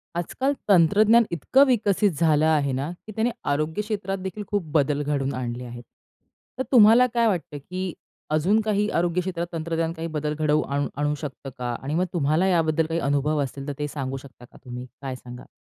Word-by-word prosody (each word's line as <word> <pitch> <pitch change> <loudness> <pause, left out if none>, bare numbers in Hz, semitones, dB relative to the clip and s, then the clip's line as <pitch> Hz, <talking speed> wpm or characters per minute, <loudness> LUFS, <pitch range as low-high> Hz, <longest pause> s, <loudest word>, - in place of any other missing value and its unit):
आज-काल 260 - -1 0.2
तंत्रज्ञान 205 +6 +5
इतकं 215 - +4
विकसित 210 -5 +2
झालं 155 -2 +3
आहे 150 -3 +2
ना 135 +5 -2 0.2
की 215 - -7
त्याने 230 +2 +1 0.2
आरोग्य 155 +7 -1
क्षेत्रातदेखील 195 -2 -4
खूप 205 -2 -1
बदल 145 -1 +2
घडवून 140 -2 -1
आणले 125 -1 -4
आहेत. 120 0 -9 0.8
तर - - +1
तुम्हाला 235 0 +7
काय 235 -1 +3
वाटतं, 170 -7 -2
की 180 +5 -5 0.4
अजून 165 +8 +2
काही 210 -1 0
आरोग्य 175 0 +1
क्षेत्रात 175 -2 -3
तंत्रज्ञान 165 0 -2
काही 165 0 -5
बदल 150 0 -1
घडवून 155 0 +2
आणू 145 0 0
आणू 145 +1 0
शकतं 140 -2 -7
का? 120 -1 -3
आणि 140 +2 -3
मग 180 +2 +2
तुम्हाला 160 +2 +2
याबद्दल 160 -3 +2
काही 165 +1 -2
अनुभव 145 +1 +1
असेल 140 +1 -7
तर 145 - -2
ते 150 - -1
सांगू 135 -2 -4
शकता 130 -2 -13
का - - -19
तुम्ही? 125 0 -7 0.2
काय 135 -2 -4
सांगाल? 125 -1 -11
160 Hz, 185 wpm, -24 LUFS, 140-190 Hz, 0.8 s, तुम्हाला